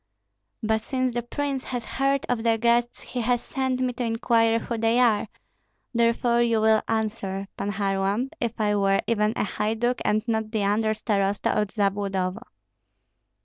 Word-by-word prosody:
But 220 0 +1
since 255 +1 -1
the 240 - -1
prince 270 +2 -3
has 245 -2 -4
heard 275 0 0
of 245 -2 0
the 225 -1 +2
guests, 235 +1 +1
he 250 - -4
has 245 +1 +1
sent 260 0 -2
me 255 -1 0
to 245 - -3
inquire 230 0 +2
who 235 +1 -3
they 225 +1 +2
are; 230 -4 +3 0.7
therefore 235 0 +2
you 230 -2 +2
will 220 0 +4
answer, 210 -3 -2
Pan 205 0 -3
Kharlamp, 200 +5 0
if 235 -1 -3
I 210 -1 +2
were 195 -1 +2
even 210 -2 +2
a - - 0
haiduk 225 +4 -1
and 215 +2 0
not 220 -1 -1
the 215 -2 -1
under 215 +2 +1
starosta 200 -2 0
of 210 0 +1
Zabludovo." 195 -2 -1
225 Hz, 165 wpm, -25 LUFS, 210-240 Hz, 0.7 s, will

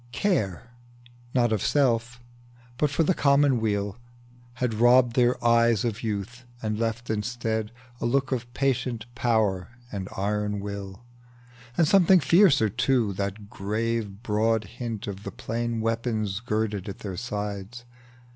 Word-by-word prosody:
Care, 120 - -1 0.6
not 120 -2 +3
of 105 - 0
self, 120 -3 +1 0.6
but 145 -1 0
of 165 - +4
the 185 - +3
commonweal, 115 - +2 0.6
Had 125 -2 -1
robbed 120 +2 +5
their 125 -1 +3
eyes 115 -2 +4
of 115 -1 -2
youth, 110 +3 -4 0.2
and 110 -1 -2
left 115 +1 -2
instead 110 0 -2 0.3
A - - -1
look 135 +3 +1
of 120 -2 -3
patient 125 -4 0
power 110 -7 +1 0.2
and 95 -2 -5
iron 105 +1 -1
will, 100 +1 -7 0.7
And 165 - +4
something 190 +1 +6
fiercer, 165 - +5
too, 120 -1 +1
that 100 +2 -4
gave 110 0 -2
broad 110 0 +1
hint 115 +1 -6
Of 100 -1 -6
the - - -6
plain 115 0 -3
weapons 110 -3 -1
girded 110 -3 -2
at 100 - -7
their 95 -2 -4
sides. 105 +2 -5
115 Hz, 135 wpm, -26 LUFS, 105-125 Hz, 0.7 s, something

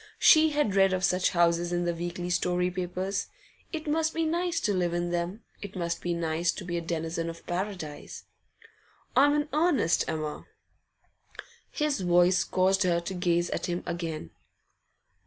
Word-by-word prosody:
She 315 0 +6
had 295 -9 0
read 195 -1 +4
of 185 0 -1
such 180 0 +2
houses 170 0 +2
in 175 0 0
the 175 - 0
weekly 175 +1 -4
story 180 0 +1
papers. 185 +2 -3 0.4
It 320 -4 -5
must 315 +1 0
be 330 0 +1
nice 340 +1 0
to 210 - +1
live 175 -2 0
in 175 0 -1
them; 175 +5 -3 0.2
it 200 -1 -8
must 170 -2 -2
be 175 -1 -1
nice 170 +1 0
to 190 - -7
be 175 -1 -3
a 170 - -1
denizen 165 0 -3
of 165 0 -10
Paradise. 180 -4 -5 0.9
'I'm 290 +3 +5
in 295 0 -1
earnest, 300 - +2
Emma.' 155 -1 -4 1.2
His 300 -6 -1
voice 180 +1 +4
caused 190 +1 +2
her 175 -3 +2
to 170 +3 -5
gaze 175 -1 0
at - - -2
him 175 0 -2
again. 165 - -4
180 Hz, 165 wpm, -28 LUFS, 170-205 Hz, 1.2 s, She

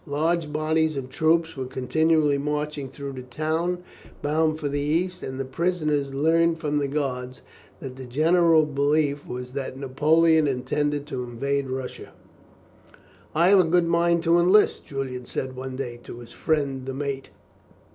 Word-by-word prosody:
Large 155 +2 0
bodies 155 +1 +1
of 130 -1 -5
troops 160 +2 +2
were 130 -2 -4
continually 150 +3 +2
marching 150 -1 -3
through 140 +1 -7
the 130 - -7
town 160 +7 -2 0.4
bound 155 +1 +1
for 150 - -3
the 145 0 -1
east, 170 +5 -1
and 130 0 -6
the 135 - -2
prisoners 150 -1 -1
learned 165 +4 +2
from 150 -2 0
the 140 - 0
guards 130 -3 -3 0.4
that 130 -1 -8
the 130 -1 -8
general 160 +4 +4
belief 145 0 0
was 125 0 -6
that 130 -1 -5
Napoleon 155 +4 +3
intended 145 +2 -1
to 130 -4 -4
invade 135 +3 -2
Russia. 130 0 -6 1.2
"I 170 +3 +4
have 200 -1 +7
a - - +6
good 170 +1 +2
mind 170 0 +2
to 170 0 +4
enlist," 185 +5 +4
Julian 130 -3 -5
said 130 -1 -4
one 130 0 -6
day, 125 -3 -5
to - - -8
his 120 -1 -12
friend 140 -4 -1
the 135 - -4
mate. 140 -1 -4
145 Hz, 160 wpm, -25 LUFS, 135-160 Hz, 1.2 s, have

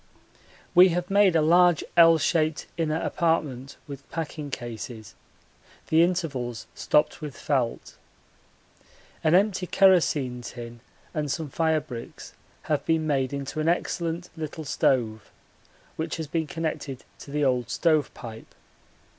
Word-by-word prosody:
We 185 +1 +8
have 180 +2 -2
made 200 -3 +5
a 160 - +4
large 175 0 +5
L 165 -1 +7
shaped 160 0 0
inner 160 -1 0
apartment 145 -7 -1
with 140 -1 -10
packing 155 -2 -5
cases, 115 -4 -7 0.8
the 160 +1 +5
intervals 145 - -1
stopped 150 +2 +1
with 150 -3 -7
felt. 130 -5 -2 1.3
An 160 +2 +4
empty 190 -1 +2
kerosene 155 -11 +3
tin 120 -1 -8 0.3
and 150 -2 -2
some 155 -2 -3
firebricks 155 -7 -2 0.3
have 150 -2 -1
been 160 -1 +1
made 135 -3 0
into 140 +2 -4
an 155 +2 +1
excellent 170 0 -2
little 155 -1 -6
stove, 115 -6 0 0.7
which 160 +1 -3
has 160 - -4
been 160 +1 -2
connected 155 -5 -4 0.2
to - - -11
the 145 +1 0
old 125 -2 +1
stove 155 -2 +2
pipe. 115 -1 -10
155 Hz, 130 wpm, -26 LUFS, 135-165 Hz, 1.3 s, We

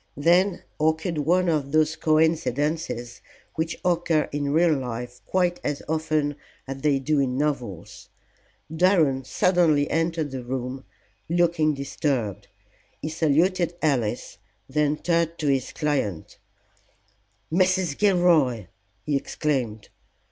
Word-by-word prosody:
Then 175 +5 +3 0.2
occurred 160 +1 0
one 175 +5 +2
of 150 -4 0
those 155 +1 +2
coincidences 155 -5 0 0.3
which 160 0 -3
occur 170 -3 +1
in 145 -1 -2
real 165 +1 +4
life 125 -2 -5
quite 180 -1 +1
as 145 -1 -3
often 155 -2 -1 0.3
as 135 0 -6
they 145 -1 +2
do 145 +2 0
in 130 -2 0
novels. 125 - -3 0.7
Durham 160 -7 +3
suddenly 160 -1 +2
entered 165 -2 0
the 130 -1 -5
room, 130 +1 -5 0.4
looking 170 -3 +2
disturbed. 135 -6 -2 0.5
He 155 - -4
saluted 170 +3 +1
Alice, 130 -10 -1 0.3
then 150 +2 +1
turned 170 -1 0
to 155 - -4
his 135 -2 0
client 120 - -2 1.1
"Mrs. 185 -3 +2
Gilroy!" 165 - +3 0.4
he 150 - 0
exclaimed. 130 -7 -2
150 Hz, 110 wpm, -24 LUFS, 135-165 Hz, 1.1 s, real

